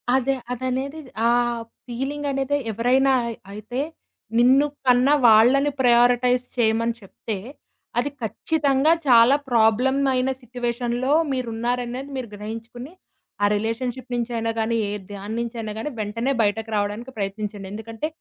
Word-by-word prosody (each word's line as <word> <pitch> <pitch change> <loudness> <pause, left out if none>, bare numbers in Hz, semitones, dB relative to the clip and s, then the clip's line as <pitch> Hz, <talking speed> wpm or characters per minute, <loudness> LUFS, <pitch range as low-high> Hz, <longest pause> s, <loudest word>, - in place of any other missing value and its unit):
అదే, 265 +1 +1 0.2
అదనేది 260 +4 -3 0.3
ఆ - - +4 0.6
ఫీలింగ్ 270 +4 -3
అనేది 275 +1 0
ఎవరైనా 255 +5 +3 0.4
అయితే, 215 +5 -5 0.6
నిన్ను 260 +4 +5 0.2
కన్న 250 +2 +5 0.2
వాళ్ళని 250 +6 +5
ప్రయారిటైజ్ 245 0 +4
చేయమని 230 0 +2
చెప్తే, 200 +1 -6 0.6
అది 285 - 0
ఖచ్చితంగా 285 +4 +1 0.2
చాలా 240 +2 +7
ప్రాబ్లమ్ 240 +3 +3 0.2
ఐన 255 +1 +1
సిట్యుయేషన్‌లో 245 +2 -2 0.2
మీరున్నారనేది 245 +2 -3
మీరు 250 -3 -5
గ్రహించుకొని 230 - -8 0.5
ఆ - - +6
రిలేషన్‌షి‌ప్ 245 +4 -3
నుంచైనా 230 -1 -1
గాని 225 +1 0
ఏ - - -3 0.2
దానినుంచైనా 220 +2 -4
గాని 265 - -3
వెంటనే 230 +5 -1
బయటకి 220 +2 -1
రావడానికి 210 +5 -3
ప్రయత్నించండి. 200 0 -4
ఎందుకంటే 225 +6 -5
240 Hz, 110 wpm, -23 LUFS, 225-260 Hz, 0.6 s, చాలా